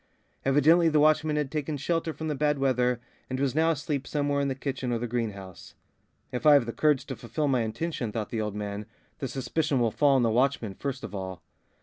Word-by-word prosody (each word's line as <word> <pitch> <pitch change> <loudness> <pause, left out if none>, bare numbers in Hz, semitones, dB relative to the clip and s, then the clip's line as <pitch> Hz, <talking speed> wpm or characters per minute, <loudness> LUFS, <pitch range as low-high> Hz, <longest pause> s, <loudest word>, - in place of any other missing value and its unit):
Evidently 155 +5 +5
the 155 -1 +3
watchman 155 0 +3
had 150 -3 -1
taken 150 -1 -2
shelter 165 +3 -1
from 160 0 -6
the 150 - 0
bad 150 0 +1
weather 125 -2 +1 0.3
and 130 0 -3
was 140 -2 +1
now 160 +2 +3
asleep 145 -3 -2
somewhere 145 -1 0
in 140 - 0
the 135 - -1
kitchen 135 -2 -3
or 120 - +1
the 120 - -3
greenhouse. 105 -6 -5 0.6
"If 125 - -4
I 150 -1 +8
have 140 -4 +4
the 115 - -4
courage 145 +2 +2
to 130 - -5
fulfil 120 +6 -2
my 130 -3 +2
intention," 115 +2 -3
thought 110 -1 -4
the 115 - -1
old 105 -1 -3
man, 105 0 -5 0.3
"the 135 - -2
suspicion 135 +3 -1
will 115 -2 +2
fall 140 +2 +3
on 130 - +3
the 115 - +2
watchman 120 -3 +1
first 140 +4 -5
of - - -7
all." 95 -2 -6
135 Hz, 225 wpm, -27 LUFS, 115-150 Hz, 0.6 s, I